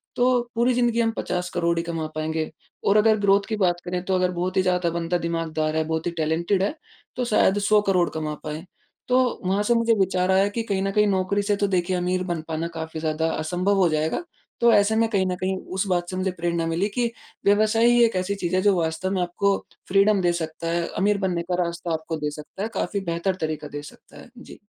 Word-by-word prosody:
तो 250 0 +3
पूरी 240 +2 +3
ज़िंदगी 240 -1 +1
हम 225 -1 +2
50 180 0 -2
करोड़ 170 -1 +1
ही 165 - 0
कमा 165 -2 -3
पाएँगे 155 0 -2 0.4
और 200 - +5
अगर 215 0 +4
ग्रोथ 200 0 +4
की 220 - 0
बात 180 -3 +2
करें, 180 0 -2
तो 190 - +1
अगर 180 0 +1
बहुत 180 +2 -2
ही - - +5
ज़्यादा 180 -2 +1
बंदा 170 +1 -1
दिमाग 165 -1 -3
दार 155 0 0
है, 160 - +2
बहुत 160 +1 -2
ही - - -1
टैलेंटेड 165 +5 +1
है, 200 - 0 0.4
तो 250 - -1
शायद 210 -3 +3
100 205 +1 +4
करोड़ 180 -3 +3
कमा 155 -1 -3
पाए। 155 +2 -5 0.4
तो 250 - +3 0.3
वहाँ 195 +3 +1
से 240 - +2
मुझे 230 0 +3
विचार 185 -1 +2
आया 190 +1 +4
कि 230 +3 -3
कहीं 195 -1 0
न 195 - 0
कहीं 210 +1 +3
नौकरी 195 +1 +1
से 205 0 +1
तो 200 0 0
देखिए 185 -1 0
अमीर 180 +1 0
बन 175 -3 -2
पाना 165 +1 -2
काफ़ी 160 0 -5
ज़्यादा 160 0 0
असंभव 180 +5 0
हो 190 -2 +4
जाएगा, 155 - -1 0.4
तो 235 0 +6
ऐसे 205 +1 +4
में 225 +1 +3
कहीं 195 -4 +1
न - - -1
कहीं 190 0 0 0.2
उस 190 - 0
बात 175 -2 0
से 185 - -4
मुझे 185 0 0
प्रेरणा 170 -1 -2
मिली 165 +5 0
कि 240 -1 +1 0.3
व्यवसाय 215 +3 +4
ही 240 0 +5
एक 230 - 0
कैसी 185 +2 -1
चीज़ें 185 -1 0
जो 205 -2 +4
वास्तव 160 +3 -1
में 190 -2 0
आपको 195 +3 +1 0.3
फ़्रीडम 200 +1 +4
दे 175 -1 +3
सकता 165 -1 -4
है, 170 0 0
अमीर 200 +3 +1
बनने 185 -3 -1
का 180 0 +2
रास्ता 170 0 -3
आपको 160 0 -3
दे 150 0 -1
सकता 150 +6 -8
है, 220 - -2
काफ़ी 200 0 -1
बेहतर 170 +3 -1
तरीका 155 -1 -3
दे 145 0 -6
सकता 145 - -15
है। - - -15
जी। 250 - -12
185 Hz, 235 wpm, -24 LUFS, 165-200 Hz, 0.4 s, तो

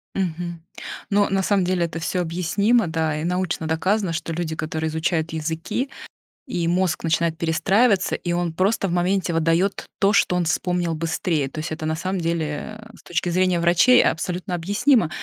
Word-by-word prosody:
Мгм. 170 -2 -3 0.5
Но, 205 0 +3
на 195 0 +1
самом 200 -1 +2
деле, 175 -1 +1
это 165 0 -5
всё 180 +2 -1
объяснимо, 185 +6 +1
да, 160 -2 -1
и - - -4
научно 175 -2 -1
доказано, 185 +3 0
что 165 0 -3
люди, 160 -1 -3
которые 160 0 -3
изучают 160 0 -1
языки, 165 - -2 0.6
и 180 -10 -2
мозг 175 -2 +1
начинает 165 0 +1
перестраиваться, 190 +5 +2
и 175 - -4
он 175 -1 -1
просто 195 +3 +1
в - - -3
моменте 180 0 +1
выдает 165 +4 +1
то, 195 +1 +3
что 180 -3 +3
он 175 - 0
вспомнил 175 0 0
быстрее. 160 -3 -1
То 155 - -7
есть 155 +1 -4
это, 155 0 -5
на 160 0 0
самом 185 +2 -2
деле, 165 +4 -3
э, 225 0 -15
с - - -19
точки 175 0 -2
зрения 180 0 +2
врачей 175 +9 +5
абсолютно 180 +2 -1
объяснимо. 205 - +2
175 Hz, 175 wpm, -22 LUFS, 160-190 Hz, 0.6 s, врачей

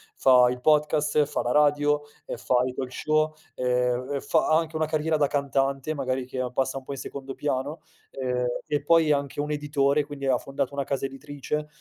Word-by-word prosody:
fa 125 -2 +6
il 125 0 -3
podcast, 150 +1 +3
fa 145 - -2
la 120 - -1
radio, 145 +1 +3 0.2
ehm, - - -4
fa 125 - 0
il 130 - -3
talk 130 -1 -4
show, 155 +2 +1 0.2
ehm, 125 +2 0
fa - - +1
anche 160 0 +2
una 155 0 +1
carriera 155 +1 0
da 145 -1 +3
cantante, 140 0 0
magari 130 -3 -2
che 130 0 -3
passa 135 +1 0
un 135 - -7
po' 135 - -8
in 140 - -5
secondo 135 +1 -7
piano, 145 +3 -2 0.3
e 125 -2 -1 0.2
e 145 -1 -1
poi 165 0 +4
è - - +6
anche 140 0 -3
un 150 - -3
editore, 145 -1 +1
quindi 145 -1 -7
ha 130 -2 +3
fondato 135 +2 -3
una 140 - -1
casa 135 0 -2
editrice, 145 +2 -5
140 Hz, 200 wpm, -26 LUFS, 130-150 Hz, 0.3 s, fa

